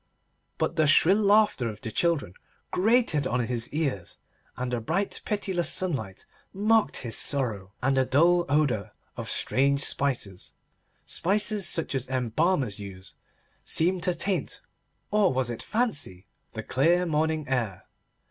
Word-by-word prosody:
But 170 - -2
the 155 -1 +3
shrill 185 +8 +5
laughter 205 - +3
of 105 -1 -9
the 110 - -5
children 160 - 0 0.4
grated 215 - +2
on 125 0 0
his 120 -1 -1
ears, 140 - -3 0.4
and 125 0 -3
the 120 - -1
bright 190 - -2
pitiless 190 -5 -1
sunlight 130 - -3 0.3
mocked 215 +3 +2
his 115 -3 -3
sorrow, 110 -9 -1
and 135 0 +2
a 130 - +2
dull 170 +5 +3
odour 140 -9 0 0.2
of - - -6
strange 140 +1 +2
spices, 120 -12 -1 0.5
spices 205 +1 +1
such 165 - -1
as 135 -2 -2
embalmers 130 - 0
use, 95 -3 -10 0.5
seemed 180 +2 +1
to 180 0 +1
taint—or 195 +2 -2
was 130 -2 0
it 115 - -4
fancy?—the 145 - -4
clear 170 +7 +2
morning 155 -1 -1
air. 110 -8 -2
145 Hz, 130 wpm, -26 LUFS, 120-180 Hz, 0.5 s, shrill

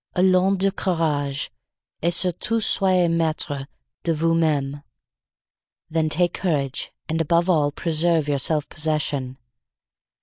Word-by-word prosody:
Allons 185 +1 +3
du 195 +1 +1
courage, 150 -7 -1 0.5
et 170 - +2
surtout 180 +6 +1
soyez 185 -4 +2
maitre 155 -4 -1 0.4
de 170 - 0
vous 165 +1 +1
meme. 145 -4 0 1.1
Then 160 -1 +1
take 175 +3 +1
courage 140 -7 -2 0.2
and 160 +1 -1
above 170 +3 +2
all 150 -4 +2
preserve 160 0 +1
your 145 -1 0
self 150 +2 +1
possession. 145 -4 -1
160 Hz, 115 wpm, -23 LUFS, 145-175 Hz, 1.1 s, Allons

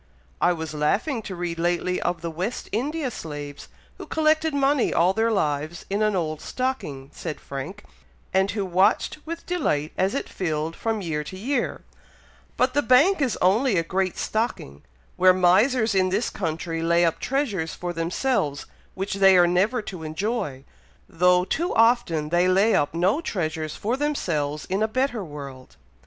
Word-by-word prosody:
"I 175 - +4
was 160 -2 -4
laughing 215 - 0
to 195 -3 -7
read 175 -1 -4
lately 175 +1 0
of 175 -1 -1
the 170 -1 -4
West 185 +9 -4
India 275 +5 -1
slaves, 145 -6 -7 0.3
who - - -8
collected 315 0 +2
money 280 -1 +2
all 180 +3 +3
their 225 +3 +1
lives 155 -5 -1
in 200 +2 0
an 215 -1 +2
old 155 -4 -2
stocking," 150 - -4
said 160 -3 -6
Frank, 140 +9 -7 0.5
"and 190 +1 +3
who 200 -1 -2
watched 185 - +2
with 335 +1 -6
delight 155 - -1
as 190 +2 +1
it - - -2
filled 160 -2 -3
from 225 -2 -2
year 150 -3 -2
to 185 - -8
year; 245 +5 -2 0.8
but 255 0 +2
the 290 - +3
bank 290 - +4
is 260 -4 +1
only 210 +4 +3
a 165 - +2
great 185 +2 -1
stocking, 215 - -2 0.4
where 185 0 +6
misers 220 +6 +3
in 185 -1 +2
this 205 +6 0
country 165 -1 -3
lay 170 +1 +3
up 165 - 0
treasures 220 - -1
for 175 -1 -4
themselves 165 - -1 0.3
which 195 +1 -3
they 195 -1 +6
are 175 - +6
never 200 +7 +1
to 185 -5 -7
enjoy, 160 - -3 0.4
though 180 +1 +3
too 340 - -1
often 225 -10 +3
they 175 +2 +3
lay 195 +5 +4
up 145 +2 +1
no 190 - +2
treasures 155 - -3
for 225 +4 -1
themselves 160 - -1
in 190 +3 -2
a 220 - +3
better 245 -1 -1
world." 140 -5 -9
185 Hz, 170 wpm, -24 LUFS, 165-230 Hz, 0.8 s, where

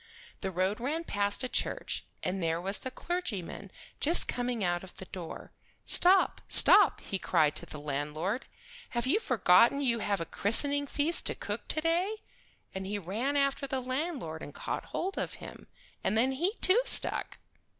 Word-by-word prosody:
The 190 - -4
road 190 +4 -2
ran 300 +7 -3
past 205 -4 -1
a - - -1
church, - - -3 0.2
and 190 +1 -3
there 165 0 -1
was 195 +3 +2
the 260 - -6
clergyman 250 - -5 0.3
just 330 +4 +4
coming 245 -3 -3
out 175 0 -1
of 190 - -13
the 190 - -9
door. 180 -3 -9 0.3
"Stop, 375 +2 +6
stop!" - - +6
he 195 - -5
cried 150 -3 +1
to - - -6
the 150 - -9
landlord. 150 - -4 0.5
"Have 235 - 0
you 320 +12 +2
forgotten 235 - +3
you 240 -5 0
have 205 -2 -2
a 165 - -4
christening 285 - +3
feast 300 +5 +1
to - - -2
cook - - -6
to 310 - -1
day?" 345 +6 0 0.6
And 190 0 -6
he 205 +1 -3
ran 220 - -3
after 275 0 0
the 265 -1 -2
landlord 255 - -4
and 145 - -10
caught - - -5
hold 385 +2 -4
of - - -4
him, - - -12 0.4
and 220 - 0
then 255 +4 +2
he 350 - -2
too 395 +7 +4
stuck. - - +3
235 Hz, 175 wpm, -29 LUFS, 185-285 Hz, 0.6 s, Stop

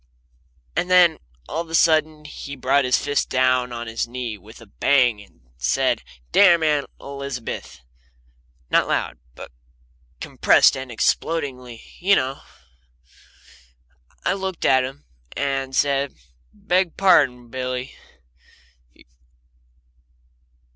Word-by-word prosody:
And 180 - -1
then 180 -3 +5 0.3
all 165 - -3
of 170 - -10
a 165 - -2
sudden 155 -2 +2
he 140 -1 -8
brought 135 +1 +1
his 125 - +3
fist 145 0 -1
down 130 -1 +1
on 120 0 -5
his 115 +1 -3
knee 120 -2 -5
with 105 +3 -15
a 115 - -14
bang 120 +1 +2
and 100 -11 -20 0.2
said, - - +1 0.3
"Damn 175 -5 +5
Aunt 150 -2 +1
Elizabeth!" 140 -4 -7 0.9
not - - +3
loud, - - -2 0.2
but - - -11 0.7
compressed - - +4
and 130 -2 -7
explodingly, 125 -2 -2 0.2
you 195 +3 +4
know. 135 +2 -2 1.8
I - - +2
looked 190 -2 -4
at 130 -1 +4
him, 135 +3 -8 0.3
and 135 -1 -1
he 130 - -8
said: 140 -1 +1 0.4
"Beg 180 - -1
pardon. 130 -11 +3
Billy. 125 +1 -4
135 Hz, 115 wpm, -22 LUFS, 125-155 Hz, 1.8 s, then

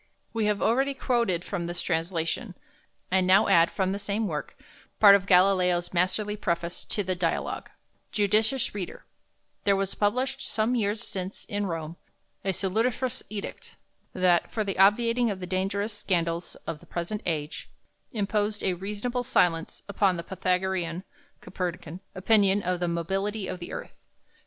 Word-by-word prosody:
We 225 -2 0
have 210 -1 0
already 270 +4 +2
quoted 235 -10 +1
from 180 -4 -3
this 175 0 -4
translation, 170 +5 -2 0.6
and 185 -1 +3
now 195 +4 +6
add 170 0 +5
from 190 -2 0
the 200 - -2
same 205 +2 -1
work 150 -4 -5 0.4
part 205 -2 +9
of 200 -1 +3
Galileo's 180 -2 +4
masterly 195 +4 +1
preface 170 -3 -2
to 205 - -1
the 185 0 -1
"Dialogue": 175 -2 -2 0.4
"Judicious 220 +5 +2
reader, 195 -4 -6 0.6
there 200 - +4
was 195 0 -1
published 255 +6 0
some 220 +3 0
years 215 -1 0
since 190 -2 -5
in 205 0 -2
Rome 165 -1 -4 0.5
a 195 - -1
salutiferous 230 +7 0
Edict, 210 -2 -7 0.4
that, 180 -2 +3
for 220 - 0
the 195 -2 -3
obviating 230 +4 +4
of 195 -2 -3
the 180 - -5
dangerous 195 +3 -1
Scandals 170 -4 -1
of 150 - -4
the - - -18
Present 175 +5 -3
Age, 155 -2 -3 0.4
imposed 210 -2 -1
a 185 - +2
reasonable 210 +7 -3
Silence 175 -9 +1
upon 200 -3 +2
the 170 - -4
Pythagorean 185 -1 -1 0.4
(Copernican) 175 -2 -5 0.2
opinion 200 +1 +3
of 180 0 0
the 175 - 0
Mobility 195 +4 -2
of 185 - -5
the 175 - -7
Earth. - - -6
195 Hz, 150 wpm, -27 LUFS, 175-210 Hz, 0.6 s, part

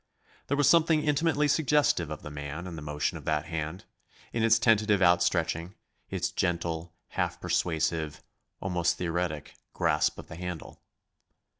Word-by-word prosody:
There 145 - 0
was 145 - +4
something 160 -2 +5
intimately 150 0 +2
suggestive 145 - +2
of 75 - -6
the 75 - -7
man 75 +4 -6
in 90 -2 -6
the 80 - -7
motion 75 0 -2
of - - -15
that 75 -1 0
hand, 80 +2 -4 0.5
in 115 - 0
its 115 0 +5
tentative 105 -3 +3
outstretching, 85 -1 +2 0.3
its - - -1
gentle, 85 -2 -2
half - - -2
persuasive 80 -2 -1 0.4
almost 90 -2 0
theoretic 85 -3 -2 0.2
grasp - - +1
of - - -8
the 80 - -9
handle. 90 -2 -6
85 Hz, 145 wpm, -29 LUFS, 80-110 Hz, 0.5 s, something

